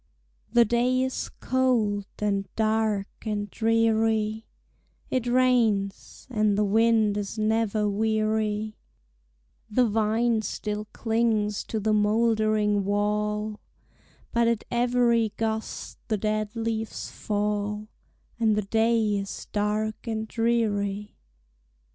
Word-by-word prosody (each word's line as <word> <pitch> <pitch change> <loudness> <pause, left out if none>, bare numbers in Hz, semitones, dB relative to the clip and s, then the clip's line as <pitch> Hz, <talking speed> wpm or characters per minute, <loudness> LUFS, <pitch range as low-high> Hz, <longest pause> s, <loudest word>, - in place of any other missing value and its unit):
The 235 0 +5
day 245 +3 +2
is 260 0 -3
cold, 230 -6 0
and 200 -2 -1
dark, 215 -2 +1 0.2
and 205 -2 -3
dreary; 225 -1 +1 0.6
It 255 -2 0
rains, 240 -6 +1
and 215 -3 +2
the 210 - +3
wind 220 0 +3
is 205 +2 -4
never 215 -1 +1
weary; 215 0 0 0.9
The 245 +4 +3
vine 225 +1 +1
still 210 0 -4
clings 220 -3 0
to 220 - -3
the 215 +1 +1
moldering 215 -1 +2
wall, 210 +1 -1 0.7
But 235 0 +2
at 230 -2 +1
every 240 -2 +2
gust 220 -1 -3
the 215 - 0
dead 215 +1 -2
leaves 225 -1 -3
fall, 210 0 -2 0.5
And 220 -2 +3
the 210 - 0
day 220 0 +2
is 195 0 -6
dark 215 +2 -1
and 220 -1 -2
dreary. 210 -3 0
215 Hz, 105 wpm, -26 LUFS, 210-225 Hz, 0.9 s, The